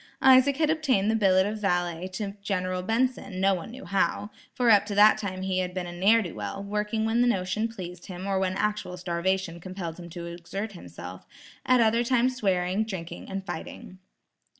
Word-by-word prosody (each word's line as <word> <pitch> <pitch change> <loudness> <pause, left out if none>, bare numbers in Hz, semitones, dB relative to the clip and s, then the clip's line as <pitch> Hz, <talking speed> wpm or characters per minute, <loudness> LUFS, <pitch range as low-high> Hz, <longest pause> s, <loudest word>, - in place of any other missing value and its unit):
Isaac 265 +1 +6
had 310 -1 +2
obtained 260 -10 +2
the - - +1
billet 190 -3 +4
of 210 +1 -4
valet 175 -2 0
to 200 0 -3
General 185 -2 -1
Benson, 225 -1 -1
no 195 +1 +4
one 180 +1 -5
knew 245 -2 -10
how, 195 +2 0 0.2
for 245 -2 +3
up 205 -2 +6
to 205 - -3
that 210 +1 +6
time 185 -2 -4
he 190 -1 0
had 180 0 -3
been 185 -1 -2
a 175 - -6
ne'er 205 +6 +4
do 175 - -6
well, 200 - -5
working 210 +2 -1
when 225 +2 +2
the 245 - +4
notion 200 0 0
pleased 180 -6 -9
him 185 0 -7
or 195 -1 0
when 185 -1 0
actual 205 -2 -2
starvation 175 0 -1
compelled 180 -2 -6
him 170 -1 -9
to 170 +1 -7
exert 175 +5 -5
himself, 90 - -10 0.4
at 255 -1 +5
other 230 +1 +3
times 255 +1 +2
swearing, 190 -3 +1
drinking 190 -6 -7
and 195 0 -4
fighting. 185 -1 -7
195 Hz, 195 wpm, -27 LUFS, 180-220 Hz, 0.4 s, Isaac